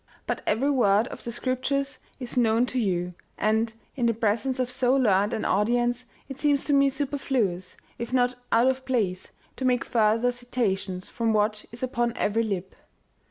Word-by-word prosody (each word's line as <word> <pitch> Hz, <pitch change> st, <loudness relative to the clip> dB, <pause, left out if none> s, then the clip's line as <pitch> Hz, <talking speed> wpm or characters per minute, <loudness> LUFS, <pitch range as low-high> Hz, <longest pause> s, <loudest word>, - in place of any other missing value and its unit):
But -, -, -2 dB
every 265 Hz, +7 st, +2 dB
word 215 Hz, -5 st, +3 dB
of -, -, -9 dB
the 235 Hz, -, -4 dB
Scriptures 265 Hz, +3 st, -1 dB, 0.2 s
is 250 Hz, -2 st, -4 dB
known 235 Hz, -1 st, +3 dB
to 255 Hz, 0 st, -2 dB
you, 180 Hz, -5 st, 0 dB, 0.3 s
and, 220 Hz, +2 st, +1 dB, 0.2 s
in 245 Hz, -4 st, +1 dB
the 230 Hz, -, +1 dB
presence 225 Hz, +4 st, 0 dB
of 250 Hz, -1 st, -1 dB
so 250 Hz, +1 st, +2 dB
learned 205 Hz, -5 st, +3 dB
an 225 Hz, -2 st, -2 dB
audience, 240 Hz, +4 st, +1 dB, 0.2 s
it 270 Hz, 0 st, -8 dB
seems 290 Hz, -2 st, +2 dB
to 290 Hz, -, 0 dB
me 275 Hz, 0 st, +5 dB
superfluous, 265 Hz, -10 st, -2 dB, 0.2 s
if 235 Hz, 0 st, -4 dB
not 250 Hz, -1 st, +2 dB, 0.2 s
out 230 Hz, +2 st, +4 dB
of 260 Hz, 0 st, +1 dB
place, 205 Hz, -9 st, -1 dB, 0.3 s
to -, -, -5 dB
make 250 Hz, -1 st, +2 dB
further 225 Hz, +2 st, +2 dB
citations 205 Hz, -7 st, -2 dB
from 230 Hz, -2 st, -1 dB
what 210 Hz, 0 st, +1 dB
is 235 Hz, +2 st, -7 dB
upon 240 Hz, -2 st, -1 dB
every 220 Hz, +2 st, +1 dB
lip." 190 Hz, -4 st, -3 dB
240 Hz, 175 wpm, -26 LUFS, 215-255 Hz, 0.3 s, me